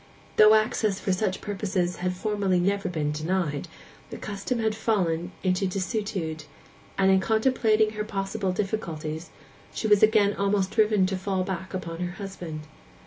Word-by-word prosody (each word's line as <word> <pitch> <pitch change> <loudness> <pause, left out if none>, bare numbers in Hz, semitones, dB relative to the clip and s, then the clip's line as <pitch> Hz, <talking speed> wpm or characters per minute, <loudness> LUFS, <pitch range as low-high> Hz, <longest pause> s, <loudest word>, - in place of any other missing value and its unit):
Though 215 0 +8
access 215 -2 +1
for 190 - 0
such 190 0 -1
purposes 190 -3 -2
had 180 0 -2
formerly 195 -2 0
never 195 +2 0
been 155 -4 -1
denied, 155 0 -1 0.4
the - - -7
custom 205 +4 -3
had 220 -1 +1
fallen 180 -6 0
into 185 +1 +1
desuetude; 185 -5 -3 0.5
and 195 0 +4
in 190 - +5
contemplating 220 0 +2
her 210 0 -3
possible 195 -1 -2
difficulties, 165 -5 -3 0.5
she - - -3
was 210 -2 +5
again 215 -2 +5
almost 200 -1 0
driven 215 -3 +3
to 190 +1 -1
fall 190 0 -1
back 190 0 -5
upon 165 -2 -5
her 175 0 -3
husband. 180 -5 -7
195 Hz, 150 wpm, -26 LUFS, 180-210 Hz, 0.5 s, Though